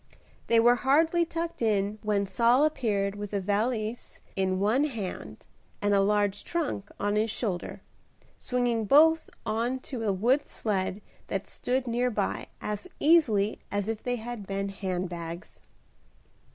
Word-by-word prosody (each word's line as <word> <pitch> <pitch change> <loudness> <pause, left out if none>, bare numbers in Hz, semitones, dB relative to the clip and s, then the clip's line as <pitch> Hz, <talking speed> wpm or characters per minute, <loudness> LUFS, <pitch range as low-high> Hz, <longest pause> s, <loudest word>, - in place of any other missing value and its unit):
They 230 - +5
were 240 +2 +5
hardly 320 +6 +3
tucked 335 -2 -4
in 210 -1 +1
when 205 -1 +1
Saul 240 +7 +4
appeared 205 -10 0
with 205 0 -7
a 200 - +1
valise 215 +3 -2 0.2
in 190 -1 0
one 225 +9 +3
hand 225 -10 -6 0.3
and 205 0 +1
a 200 - +5
large 205 0 +1
trunk 295 -12 -2
on 205 0 0
his 215 +2 +2
shoulder, 200 -5 -3 0.5
swinging 245 -3 0
both 315 +7 +5 0.2
on 230 +4 0
to 250 -3 -6
a 215 -3 +1
wood 240 +9 +2
sled 200 -1 -2 0.2
that 195 0 -2
stood 255 +1 -2
near 245 +1 +1
by 210 -4 -2
as 210 - -4
easily 235 -11 +4
as 205 0 -1
if 225 -1 -3
they 245 0 -1
had 230 -3 -6
been 195 0 -2
hand 185 -2 -3
bags. 170 0 -7
215 Hz, 150 wpm, -28 LUFS, 200-250 Hz, 0.5 s, They